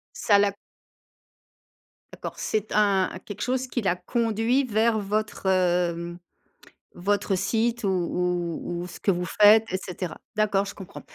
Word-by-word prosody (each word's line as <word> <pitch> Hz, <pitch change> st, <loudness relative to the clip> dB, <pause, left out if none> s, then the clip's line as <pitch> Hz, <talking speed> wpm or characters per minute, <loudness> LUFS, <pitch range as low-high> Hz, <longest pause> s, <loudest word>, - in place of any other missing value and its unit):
Ça 210 Hz, -, +4 dB
la 200 Hz, 0 st, +3 dB, 1.6 s
D'accord -, -, -7 dB
c'est 215 Hz, -1 st, -2 dB
un 200 Hz, -3 st, +3 dB
quelque 205 Hz, -1 st, -8 dB
chose 255 Hz, +3 st, -1 dB
qui 245 Hz, -, -2 dB
l'a 185 Hz, -5 st, +1 dB
conduit 230 Hz, +6 st, 0 dB
vers 225 Hz, -1 st, +2 dB
votre, 210 Hz, 0 st, -2 dB
hem, 175 Hz, -2 st, +1 dB, 0.8 s
votre 200 Hz, +2 st, 0 dB
site 225 Hz, +5 st, 0 dB
ou -, -, +1 dB
ou 175 Hz, -1 st, -1 dB
ou -, -, -6 dB
ce -, -, -11 dB
que -, -, -1 dB
vous 180 Hz, -1 st, +1 dB
faites 210 Hz, +5 st, +6 dB
et -, -, +2 dB
cetera. 180 Hz, -3 st, -6 dB, 0.2 s
D'accord? 205 Hz, -2 st, +2 dB
je 200 Hz, -, -8 dB
comprends. 190 Hz, 0 st, -10 dB
200 Hz, 145 wpm, -25 LUFS, 180-215 Hz, 1.6 s, faites